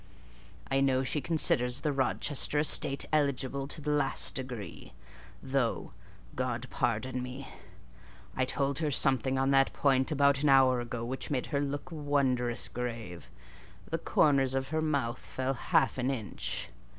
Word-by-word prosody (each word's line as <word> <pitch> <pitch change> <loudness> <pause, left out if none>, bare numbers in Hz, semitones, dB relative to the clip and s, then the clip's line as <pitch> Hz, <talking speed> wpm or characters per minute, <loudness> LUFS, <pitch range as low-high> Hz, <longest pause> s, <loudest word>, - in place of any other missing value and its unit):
I 135 0 +2
know 130 -1 +2
she 145 +3 -1
considers 130 -3 +2
the 150 -2 0
Rochester 140 +2 0
estate 140 -2 +2
eligible 140 -2 0
to 155 - -7
the 150 +1 -2
last 145 -2 +3
degree; 125 -5 -7 0.5
though 130 -7 -1 0.4
(God 125 -1 -2
pardon 125 +3 -1
me!) 125 +2 -7 0.9
I 130 - +1
told 140 +2 -1
her 155 -2 0
something 130 -1 +1
on 135 +1 +2
that 135 0 +4
point 135 -1 +2
about 140 -2 +3
an 150 - +3
hour 130 -2 +5
ago 120 -1 -5
which 130 +2 -5
made 130 -4 -1
her 140 - +1
look 145 +4 -4
wondrous 130 - 0
grave: 115 -5 -6 0.6
the - - -1
corners 135 -3 +2
of 135 0 -2
her 155 +1 -1
mouth 140 -6 -1
fell 130 +1 -3
half 130 - +1
an 130 +1 0
inch. 115 -7 -4
135 Hz, 150 wpm, -30 LUFS, 125-140 Hz, 0.9 s, hour